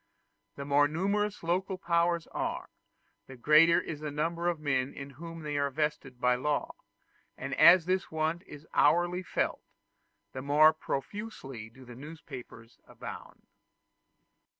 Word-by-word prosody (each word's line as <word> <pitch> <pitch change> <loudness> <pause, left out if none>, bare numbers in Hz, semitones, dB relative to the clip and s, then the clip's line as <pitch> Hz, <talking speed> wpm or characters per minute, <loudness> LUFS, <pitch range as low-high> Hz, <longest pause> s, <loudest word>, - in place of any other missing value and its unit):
The 140 - -6
more 145 +1 +4
numerous 200 +6 -1
local 185 +3 -1
powers 170 -1 +1
are, - - -4 0.6
the 135 - -10
greater 155 +6 +6
is 155 -3 -6
the 150 0 -4
number 165 +4 -2
of 175 -3 0
men 135 -3 -1
in 140 0 -8
whom 165 +4 -9
they 150 -1 -3
are 140 0 +1
vested 140 -3 -3
by 125 0 +3
law; 145 +4 -1 0.6
and - - -5
as 170 0 +7
this 185 +1 0
want 160 +2 -1
is 150 +1 -11
hourly 175 +4 +3
felt, 180 - -2 0.7
the 130 - -5
more 150 +3 +5
profusely 135 - -6
do 130 +3 -16
newspapers 125 -3 -11
abound. - - -10
155 Hz, 135 wpm, -30 LUFS, 140-170 Hz, 0.7 s, as